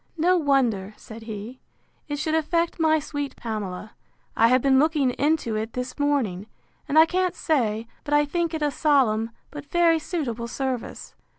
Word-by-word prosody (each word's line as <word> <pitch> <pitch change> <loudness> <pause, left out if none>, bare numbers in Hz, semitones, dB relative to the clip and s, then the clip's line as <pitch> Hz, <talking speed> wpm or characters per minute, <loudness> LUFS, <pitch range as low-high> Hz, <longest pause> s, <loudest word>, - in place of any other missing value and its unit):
—No 355 +3 +3
wonder, 245 - +1
said 225 0 -11
he, 220 +4 -7 0.5
it 290 -1 -3
should 310 +2 -2
affect 335 +2 0
my 315 -1 +4
sweet 290 -2 -4
Pamela: 210 -3 -5 0.4
I 225 - +5
have 255 +2 +4
been 265 -1 +4
looking 295 -3 +2
into 285 -4 0
it 220 +1 -3
this 250 +3 -5
morning, 240 -10 0 0.4
and 295 - +1
I 320 - +9
can't 365 +1 0
say 230 -8 0 0.2
but 295 -1 0
I 295 0 +4
think 335 +2 -1
it 310 - -2
a 295 - +1
solemn, 245 -8 +2 0.2
but 290 -1 -9
very 340 -2 +3
suitable 255 -9 -3
service. 260 0 -4
280 Hz, 170 wpm, -24 LUFS, 230-315 Hz, 0.5 s, I